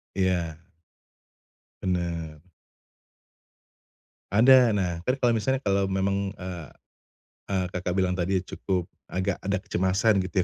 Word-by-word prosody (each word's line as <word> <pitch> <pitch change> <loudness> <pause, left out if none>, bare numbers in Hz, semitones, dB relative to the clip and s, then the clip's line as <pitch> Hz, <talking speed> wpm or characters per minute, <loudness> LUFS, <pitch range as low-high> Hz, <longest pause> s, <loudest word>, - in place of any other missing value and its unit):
Iya. 90 -4 0 1.3
Benar. 85 -4 -3 1.9
Ada, 125 +2 +7
nah, 95 -4 0
entar 125 - +2
kalau 120 -1 +4
misalnya 130 +5 0
kalau 100 -4 +1
memang, 95 +1 0
eee 90 -4 -6 0.8
eee 95 -2 0
Kakak 90 0 -2
bilang 95 -1 +2
tadi 90 +1 0
cukup 90 -1 -2 0.2
agak 95 +1 -1
ada 100 +2 0
kecemasan 95 +3 +1
gitu 90 0 0
95 Hz, 110 wpm, -26 LUFS, 90-100 Hz, 1.9 s, Ada